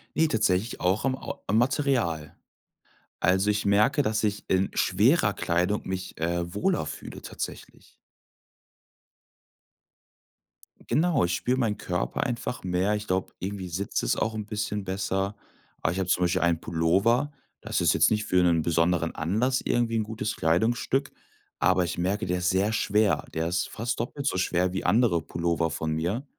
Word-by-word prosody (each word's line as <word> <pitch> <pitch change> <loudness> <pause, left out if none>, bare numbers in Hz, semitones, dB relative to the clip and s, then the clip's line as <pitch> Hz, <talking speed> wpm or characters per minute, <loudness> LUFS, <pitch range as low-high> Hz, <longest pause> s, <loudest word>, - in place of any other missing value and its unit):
Ne, 160 +1 +3
tatsächlich 110 -3 0
auch 95 +6 +1
am 130 -1 +1
Ou - - -6
am 105 +3 +2
Material. 120 - 0 0.8
Also, 95 +3 +2
ich 105 0 0
merke, 105 +8 +3
dass 110 -4 0
ich 105 -1 -1
in 95 +1 +2
schwerer - - +3
Kleidung 90 +5 0
mich, 95 -1 -5
äh, 85 +1 -1
wohler 175 - 0
fühle - - -8
tatsächlich. - - -8 3.0
Genau, 160 -4 +3
ich 85 0 +1
spüre 125 - 0
meinen 110 -5 0
Körper 90 +1 -2
einfach 120 0 -3
mehr. 90 +3 +1
Ich 105 0 -4
glaube, 95 -1 -1
irgendwie 95 -1 -5
sitzt 95 +4 -2
es - - +1
auch 110 - -1
'n 105 -1 -5
bisschen 105 -1 -3
besser. 95 +1 -2 0.5
Aber - - +2
ich 95 - -3
habe 95 -1 -2
zum 90 - +2
Beispiel 90 +1 +1
einen 85 -1 +2
Pullover. 100 - +1 0.3
Das - - -1
ist - - +3
jetzt - - +4
nicht 105 0 0
für 90 -3 +3
'nen 85 -2 +3
besonderen 85 0 +1
Anlass 110 +11 0
irgendwie 120 -1 +1
'n - - +2
gutes 105 -1 -4
Kleidungsstück, 120 - +1 0.5
aber 90 +2 +3
ich 85 0 -3
merke, 100 +5 0
der 90 0 -1
ist 90 0 +1
sehr 100 +4 +1
schwer. 105 -1 +2
Der 80 +1 0
ist 90 -1 -1
fast 115 +3 -3
doppelt 135 +4 -4
so - - +1
schwer 90 0 +1
wie 95 - -2
andere 110 -7 +3
Pullover 85 +1 -1
von 80 0 -3
mir 90 - -2
95 Hz, 165 wpm, -27 LUFS, 90-110 Hz, 3.0 s, jetzt